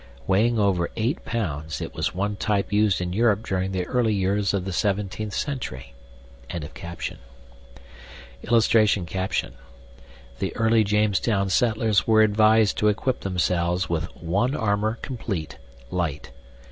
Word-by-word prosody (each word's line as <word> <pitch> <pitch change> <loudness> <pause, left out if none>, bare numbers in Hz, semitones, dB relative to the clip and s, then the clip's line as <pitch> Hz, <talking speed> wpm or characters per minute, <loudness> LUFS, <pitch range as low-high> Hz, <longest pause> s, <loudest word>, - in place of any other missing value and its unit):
WEIGHING 115 +5 +2
OVER 95 -5 +1
8 115 +8 -1
POUNDS, 80 -9 -3
IT - - -6
WAS - - -2
ONE 100 +2 -1
TYPE 105 0 -1
USED 105 -3 +3
IN 90 0 -3
EUROPE 110 0 +2
DURING 95 0 -1
THE 90 -1 -2
EARLY 115 -2 +1
YEARS 100 +1 +1
OF 95 -2 -2
THE 95 - -3
17TH 100 +2 -1
CENTURY.] 125 - -4 2.5
[Illustration: 105 -5 +2 0.9
THE - - -3
EARLY 115 0 +3
JAMESTOWN 105 -1 +1
SETTLERS 110 -1 +2
WERE 110 -1 +6
ADVISED 110 0 +4
TO 105 - +3
EQUIP 125 +5 0
THEMSELVES 90 -1 0
WITH 85 -1 0
"ONE 100 - 0
ARMOUR 110 0 0
COMPLEAT, 100 - -5 0.3
LIGHT." 80 -5 -3
100 Hz, 120 wpm, -24 LUFS, 90-110 Hz, 2.5 s, WERE